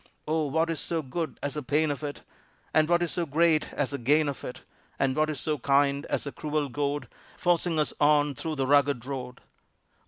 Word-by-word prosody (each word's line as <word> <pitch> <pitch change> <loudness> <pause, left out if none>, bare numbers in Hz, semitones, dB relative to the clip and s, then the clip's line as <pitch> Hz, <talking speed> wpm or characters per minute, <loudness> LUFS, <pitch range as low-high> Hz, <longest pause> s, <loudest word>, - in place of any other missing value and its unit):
Oh, 155 -1 +1
what 160 +4 +1
is 165 - -3
so 165 -2 -1
good 155 +2 -4
as 145 - -2
the 150 - -3
pain 150 +3 +1
of 145 - -4
it, 145 -1 -5 0.5
And 155 0 +4
what 175 0 +3
is 170 - -1
so 170 -2 -2
great 155 +1 +2
as 145 -2 -1
the 140 - -3
gain 150 +5 +3
of 140 - -4
it? 125 - -7 0.3
And 130 -1 +1
what 155 0 +2
is 150 -4 -3
so 150 +1 -1
kind 140 +2 +2
as - - -1
the 140 - -5
cruel 150 -1 -2
goad, 145 0 -2 0.3
Forcing 175 -1 +1
us 150 - +1
on 145 -1 +4
through 155 +4 -4
the 135 -2 0
rugged 140 -3 +3
road? 125 -2 -6
145 Hz, 215 wpm, -28 LUFS, 140-155 Hz, 0.5 s, And